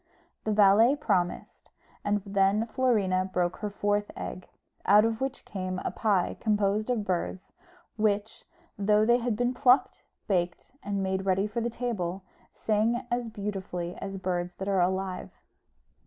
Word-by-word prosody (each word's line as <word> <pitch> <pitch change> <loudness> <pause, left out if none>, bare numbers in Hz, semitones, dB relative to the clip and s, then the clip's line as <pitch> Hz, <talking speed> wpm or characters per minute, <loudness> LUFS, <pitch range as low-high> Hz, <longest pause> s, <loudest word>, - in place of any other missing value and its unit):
The 215 - +1
valet 210 +5 +6
promised; 195 -11 -2 0.3
and 205 -1 0
then 200 +2 +2
Florina 210 -7 +1
broke 180 0 0
her 210 - -3
fourth 205 0 0
egg, 185 - -6 0.4
out 210 +2 +6
of 225 +1 -1
which 270 0 -3
came 185 -2 -4
a - - 0
pie 200 -5 0
composed 210 0 +1
of 230 -4 0
birds, 185 0 -3 0.4
which, 210 0 0 0.3
though 210 +1 +3
they 240 +2 +4
had 240 -2 -1
been 245 +3 0
plucked, 250 +1 +3 0.2
baked, 175 -4 -1
and 200 -1 -2
made 190 0 -2
ready 190 +1 +2
for 210 +3 -3
the 235 - -1
table, 195 -7 -3 0.3
sang 220 +2 0
as 240 -1 -1
beautifully 195 -4 -4
as 195 0 -5
birds 180 -1 -2
that 190 - -6
are 195 -2 +2
alive. 185 +1 -1
205 Hz, 150 wpm, -28 LUFS, 190-220 Hz, 0.4 s, valet